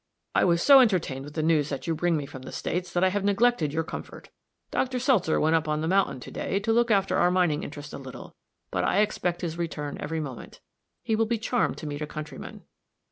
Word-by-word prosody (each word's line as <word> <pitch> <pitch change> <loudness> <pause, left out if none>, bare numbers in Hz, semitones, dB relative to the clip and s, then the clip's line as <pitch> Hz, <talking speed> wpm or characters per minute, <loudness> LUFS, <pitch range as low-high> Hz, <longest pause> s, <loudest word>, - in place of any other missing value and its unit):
I - - +3
was 170 -1 +2
so 280 -1 +9
entertained 180 - +1
with 145 - -11
the 155 - -1
news 155 -2 +2
that 140 - -4
you 165 - 0
bring 165 +1 +1
me 145 - -3
from 130 -1 -10
the 130 - -9
States 180 0 -3
that 175 - +1
I 190 - +5
have 200 +1 -1
neglected 205 -5 +2
your 160 +2 -1
comfort. - - -8 0.4
Dr. 255 -1 0
Seltzer 240 - +2
went 160 +1 +3
up 160 -1 +1
on 150 0 0
the 160 - -1
mountain, 190 -7 +2
to - - -9
day, 195 - -2
to 225 +2 +1
look 235 +1 +3
after 195 -3 +2
our 175 - +4
mining 175 -4 +2
interest 145 0 -8
a - - -6
little, 130 -2 -10 0.4
but - - 0
I 200 - +3
expect 180 -4 -1
his 170 -1 -4
return 150 -3 -4
every 160 +1 -3
moment. 135 -6 -7 0.4
He 220 - 0
will 225 0 +1
be 235 +1 0
charmed 235 +2 0
to - - -8
meet 145 0 -5
a 150 - -3
countryman." 155 0 -8
170 Hz, 240 wpm, -26 LUFS, 150-205 Hz, 0.4 s, so